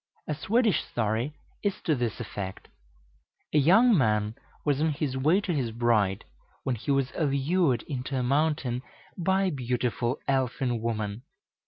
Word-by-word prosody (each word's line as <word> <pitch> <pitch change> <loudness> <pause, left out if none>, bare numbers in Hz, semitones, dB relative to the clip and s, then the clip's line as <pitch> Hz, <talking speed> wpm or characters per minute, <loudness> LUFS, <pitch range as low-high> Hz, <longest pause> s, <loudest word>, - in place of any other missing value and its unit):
A 150 - 0
Swedish 220 - +2
story 115 +4 -1 0.3
is 205 -2 0
to 160 - +2
this 120 -5 -2
effect. 100 -4 -6 0.9
A 150 - +5
young 205 - +6
man 105 - +2 0.3
was 145 -1 +2
on 160 -1 +2
his 140 -2 -2
way 155 +8 +3
to 185 -3 -2
his 130 -6 0
bride, 110 -4 +1 0.4
when 130 - 0
he 115 - -8
was 135 -2 +2
allured 145 -1 +1
into 135 -1 -4
a 125 - 0
mountain 140 -2 +1 0.3
by 190 +2 +1
a 190 - +1
beautiful 125 -1 -1
elfin 130 -3 0
woman. 110 -1 -2
130 Hz, 150 wpm, -28 LUFS, 120-155 Hz, 0.9 s, young